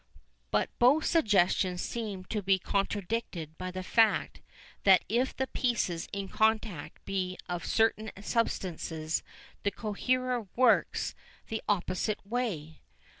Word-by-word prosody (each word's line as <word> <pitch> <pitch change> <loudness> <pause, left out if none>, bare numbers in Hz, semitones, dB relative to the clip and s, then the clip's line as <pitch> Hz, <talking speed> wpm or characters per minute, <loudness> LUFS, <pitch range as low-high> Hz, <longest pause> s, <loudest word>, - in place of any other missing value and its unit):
But - - +1
both 270 +6 +5
suggestions 190 - +3
seem 205 -5 -4
to 210 +2 -2
be 195 0 +3
contradicted 195 -4 -2
by 185 0 -3
the 185 0 -5
fact 225 +3 +2 0.4
that 190 -2 +6
if 245 +5 +1
the 265 - +1
pieces 230 -11 -1
in 200 -1 -3
contact 220 -7 0
be 185 -2 -2
of 175 -1 -3
certain 220 -1 +2
substances 170 -7 -1 0.4
the 200 - +1
coherer 245 +3 -1
works 250 -2 +3 0.4
the 220 0 -2
opposite 200 +1 0
way. 200 -10 -3
205 Hz, 120 wpm, -30 LUFS, 185-230 Hz, 0.4 s, that